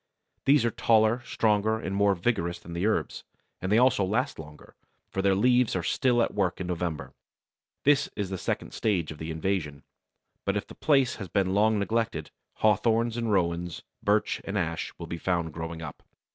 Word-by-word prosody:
These 140 -3 +5
are 115 - +1
taller, 110 +2 +3
stronger, 110 -1 +1
and 95 -3 -4
more 100 0 +3
vigorous 85 -3 -1
than 85 -1 -11
the 85 +5 0
herbs, 110 - -1 0.4
and 95 - -2
they 105 - +5
also 125 -4 +4
last 115 - -1
longer, 75 -1 -12 0.4
for 95 - -1
their 95 0 +3
leaves 125 +2 +3
are 90 - -1
still 120 +3 +2
at - - -2
work 95 -3 0
in 95 - -3
November. 90 -3 -3 0.7
This 145 +1 +3
is 100 -3 -3
the 95 - -3
second - - -3
stage 95 -9 0
of 75 - -10
the 80 - -5
invasion. 80 -3 -2 0.6
But 100 +1 0
if 105 - -3
the - - -12
place 135 -4 +2
has 100 - -6
been 95 +1 0
long 110 +2 +3
neglected, 110 -6 -1 0.3
Hawthorns 110 +2 +3
and 115 -2 -1
Rowans, 85 -3 0 0.2
Birch 105 +1 +1
and 100 +1 -3
Ash 85 -3 -2
will - - -6
be 85 - -6
found 85 -3 -1
growing 80 0 -6
up. 80 - -8
100 Hz, 185 wpm, -27 LUFS, 85-110 Hz, 0.7 s, These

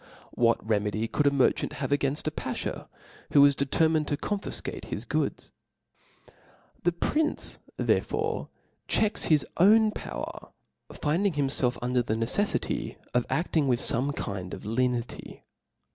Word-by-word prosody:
What 115 -2 +2
re 110 -2 +3
medy 105 +2 -2
could 145 +5 +1
a - - +5
merchant 140 -2 +2
have 140 -1 -4
againfl 145 +1 0
a 155 - 0
bafhaw, - - -4 0.5
who 140 - +7
was 140 0 +6
determined 155 +2 +2
'to 145 - -1
confifcate 205 +6 -3
his - - -4
goods? - - -2 1.3
The 175 - +2
prince 300 - 0 0.2
therefore - - 0 0.4
checks 215 0 +1
his 155 -3 +3
own 215 +4 +6
power, - - -7 0.4
finding 175 +6 0
himfelf 135 -4 +1
under 125 +1 +1
a - - +1
neceflity 115 - -1 0.2
of 125 0 +1
^Aing 155 +1 0
widi 125 -2 +2
fome 135 +5 0
kind 95 -2 -4
of - - -12
lenity. 120 +2 -2
140 Hz, 135 wpm, -27 LUFS, 120-160 Hz, 1.3 s, who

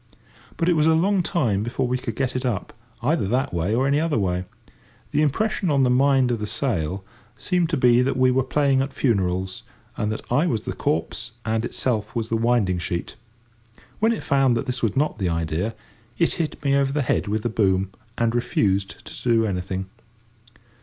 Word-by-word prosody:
But 165 - 0
it 175 - +4
was 155 0 +3
a 160 - +5
long 190 +4 +2
time 125 - 0
before 120 +3 -1
we 125 +1 -1
could 115 -3 -5
get 130 0 -1
it 130 - -1
up, 120 -6 -2 0.3
either 150 - +1
that 130 +4 0
way 90 +6 0
or 130 +3 +2
any 140 +2 +2
other 160 -5 0
way. 90 -3 0 0.7
The - - +2
impression 185 +5 +1
on 140 -2 +3
the 125 - +3
mind 130 -1 +3
of 115 - -1
the 105 - -3
sail 95 - -1 0.3
seemed 180 -3 0
to 165 - 0
be 125 -1 +5
that 130 0 0
we 130 0 +4
were 130 +1 +2
playing 135 0 +2
at 135 +1 -2
funerals, 95 -6 0 0.3
and 105 0 -1
that 110 - -4
I 145 +8 +3
was 115 - -1
the - - -4
corpse 115 +8 -2
and 110 0 0
itself 110 -4 -2
was 115 -1 -2
the 115 - +1
winding 115 -6 +2
sheet. 85 0 -3 0.8
When 225 +2 +3
it 230 - -3
found 135 -3 +3
that 115 - -2
this 125 -2 -3
was 115 - 0
not 145 -4 0
the 95 -3 0
idea, 85 +6 -2 0.4
it 170 - +2
hit 160 -3 -3
me 140 -1 +2
over 140 -1 +2
the 145 0 0
head 120 - 0
with 105 +1 -1
the 120 - 0
boom, 95 -3 +1 0.3
and 115 -1 +1
refused 100 -4 0
to - - -9
do 115 -1 +4
anything. 95 -1 -3
120 Hz, 205 wpm, -23 LUFS, 100-140 Hz, 0.8 s, a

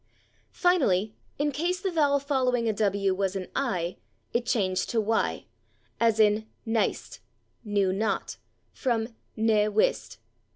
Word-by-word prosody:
Finally, 220 - +2 0.2
in 290 +1 0
case 345 +6 -1
the 385 -1 -2
vowel 290 -4 +3
following 255 -4 0
a 220 - +2
/w/ 200 -2 +1
was 195 0 -1
an 190 -1 -3
/i/, 185 -10 -1 0.4
it 240 0 0
changed 190 -7 0
to 230 - +1
/y/, 220 +1 0 0.5
as 230 -1 +3
in 215 0 +3 0.2
/nyste/ 225 -1 -1 0.4
(=/knew 200 -3 +1
not/), 215 +3 -2 0.3
from 230 -4 -1 0.3
/ne 215 -1 +3
wiste 210 +1 +1
220 Hz, 130 wpm, -27 LUFS, 200-260 Hz, 0.5 s, vowel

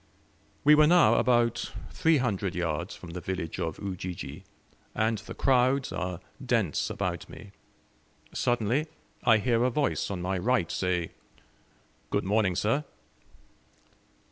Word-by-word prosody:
We 150 - +7
were 150 0 +6
now 170 -10 +6
about 120 -1 +2 0.2
three 160 -1 +3
hundred 100 -7 -1
yards 85 0 -2
from 90 - -10
the 90 +1 -6
village 90 -2 -4
of 80 -3 -2
Ujiji, 90 -3 -6 0.5
and 110 0 +1
the 110 - -9
crowds 130 +1 +2
are 90 -1 -3 0.2
dense 115 - 0
about - - -3
me. 100 - -11 0.8
Suddenly 120 +5 +1 0.4
I 110 - +6
hear 115 +2 +1
a 125 - +3
voice 140 +3 0
on 100 -3 -3
my 90 +1 -1
right 105 -4 +1
say, 90 -2 -1 1.0
"Good - - 0
morning, 100 -2 +1
sir!" 115 +11 +1
105 Hz, 130 wpm, -28 LUFS, 90-125 Hz, 1.0 s, We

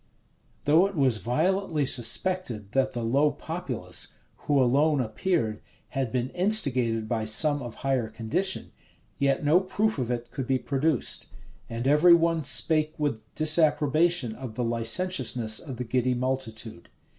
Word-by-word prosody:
[*] - - -38
Though 160 +6 +5
it 200 - -8
was 135 -6 +2
violently 155 - 0
suspected 120 - 0
that 135 +1 +1
the 120 - -4
low 140 +6 +3
populace, 130 - -5 0.3
who 145 -2 +3
alone 140 +4 +3
appeared, 110 - -1 0.3
had 135 -4 -2
been 125 0 -1
instigated 130 - +1
by 110 -1 -1
some 145 +7 +1
of 120 -3 -7
higher 130 -5 0
condition, 115 - -3 0.5
yet 140 +1 +1
no 155 +5 +5
proof 200 0 -1
of 125 -2 -2
it 120 -1 -4
could 130 -1 -5
be 130 - +2
produced; 140 +1 -1 0.4
and 115 +2 -3
every 155 +5 +6
one 165 -1 +1
spake 155 +2 +2
with 145 -7 -2
disapprobation 155 -3 +2
of 120 -1 -8
the 125 - -2
licentiousness 115 -1 0
of 135 -5 -8
the 125 - -3
giddy 125 +1 0
multitude. 120 -6 -4
135 Hz, 145 wpm, -26 LUFS, 120-160 Hz, 0.5 s, every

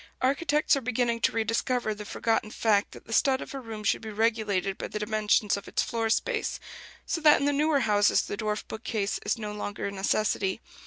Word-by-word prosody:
Architects 295 +3 +2
are 275 - -2
beginning 240 -1 0
to - - +3
rediscover 225 +1 0
the 210 0 -8
forgotten 225 +1 -1
fact 215 -2 +1
that - - -13
the 225 - -6
stud 265 +2 +3
of - - -8
a 275 - -4
room 225 -4 -7
should 200 - +1
be 220 - -7
regulated 210 -3 0
by - - -5
the - - -5
dimensions 210 -1 +1
of 200 - -8
its - - 0
floor 225 -1 -1
space; 440 - 0 0.5
so 330 - -2
that 300 -1 +6
in 280 - 0
the 290 - +2
newer 295 0 +2
houses 205 -3 +3
the - - -4
dwarf 210 0 -2
bookcase 220 -2 -3
is - - 0
no 210 -2 -5
longer 205 -1 -4
a 200 - -2
necessity. 200 0 0
220 Hz, 210 wpm, -27 LUFS, 210-250 Hz, 0.5 s, that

